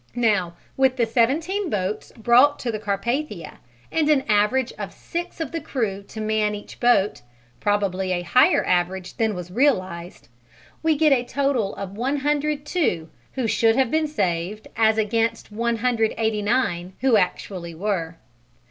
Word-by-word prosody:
Now 200 Hz, -8 st, +1 dB, 0.2 s
with 265 Hz, -1 st, +3 dB
the 235 Hz, -, +3 dB
17 315 Hz, -, +1 dB
boats 200 Hz, 0 st, -3 dB
brought 245 Hz, +6 st, +5 dB
to 240 Hz, -, -3 dB
the 215 Hz, -, -4 dB
Carpathia 210 Hz, -, -3 dB, 0.3 s
and 310 Hz, -2 st, +1 dB
an 285 Hz, -3 st, +4 dB
average 215 Hz, +4 st, +2 dB
of -, -, -5 dB
six 345 Hz, 0 st, -6 dB
of 325 Hz, -4 st, -3 dB
the 330 Hz, -1 st, -3 dB
crew 220 Hz, -9 st, -2 dB
to 220 Hz, -, -9 dB
man 215 Hz, -1 st, 0 dB
each 205 Hz, -, -10 dB
boat, 210 Hz, -5 st, +3 dB, 0.4 s
probably 190 Hz, 0 st, 0 dB
a 175 Hz, -1 st, -1 dB
higher 250 Hz, -, +4 dB
average 180 Hz, +1 st, -1 dB
than 220 Hz, -2 st, +1 dB
was 180 Hz, 0 st, -7 dB
realized, 185 Hz, -8 st, 0 dB, 0.5 s
we 320 Hz, -1 st, +2 dB
get 305 Hz, -1 st, +5 dB
a 245 Hz, -2 st, +2 dB
total 255 Hz, -5 st, -1 dB
of 195 Hz, -1 st, -6 dB
102 290 Hz, -, -1 dB, 0.2 s
who 255 Hz, -3 st, -1 dB
should 225 Hz, +1 st, +3 dB
have 260 Hz, -2 st, +2 dB
been 315 Hz, 0 st, +1 dB
saved 185 Hz, -, -2 dB
as 220 Hz, -1 st, +3 dB
against 225 Hz, +1 st, 0 dB
189 225 Hz, -4 st, 0 dB
who 260 Hz, -3 st, +4 dB
actually 180 Hz, -3 st, -1 dB
were. 175 Hz, -3 st, -2 dB
225 Hz, 145 wpm, -23 LUFS, 195-265 Hz, 0.5 s, brought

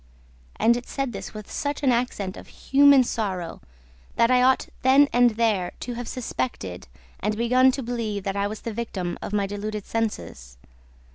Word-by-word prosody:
And 235 Hz, +1 st, +3 dB
it 245 Hz, +1 st, -6 dB
said 275 Hz, -3 st, -3 dB
this 195 Hz, +1 st, -7 dB
with 215 Hz, -1 st, -9 dB
such 285 Hz, 0 st, -3 dB
an 265 Hz, -, +4 dB
accent 235 Hz, -6 st, -1 dB
of -, -, -11 dB
HUMAN 280 Hz, -1 st, +5 dB
sorrow 190 Hz, -8 st, -3 dB, 0.5 s
that 230 Hz, +1 st, +3 dB
I 250 Hz, 0 st, +5 dB
ought 260 Hz, +1 st, +3 dB
then 270 Hz, +2 st, +6 dB
and 245 Hz, 0 st, +6 dB
there 215 Hz, -6 st, +1 dB
to 245 Hz, -, -4 dB
have 240 Hz, 0 st, -6 dB
suspected 130 Hz, -, -4 dB, 0.3 s
and 210 Hz, +1 st, -1 dB
begun 250 Hz, +3 st, +4 dB
to 270 Hz, -, -3 dB
believe 225 Hz, -4 st, -3 dB
that 195 Hz, 0 st, -2 dB
I 200 Hz, 0 st, 0 dB
was 210 Hz, +1 st, -7 dB
the 230 Hz, -, -5 dB
victim 195 Hz, -6 st, -4 dB
of -, -, -5 dB
my 205 Hz, -1 st, +1 dB
deluded 205 Hz, +1 st, -5 dB
senses. 70 Hz, -, -4 dB
225 Hz, 180 wpm, -24 LUFS, 200-250 Hz, 0.5 s, then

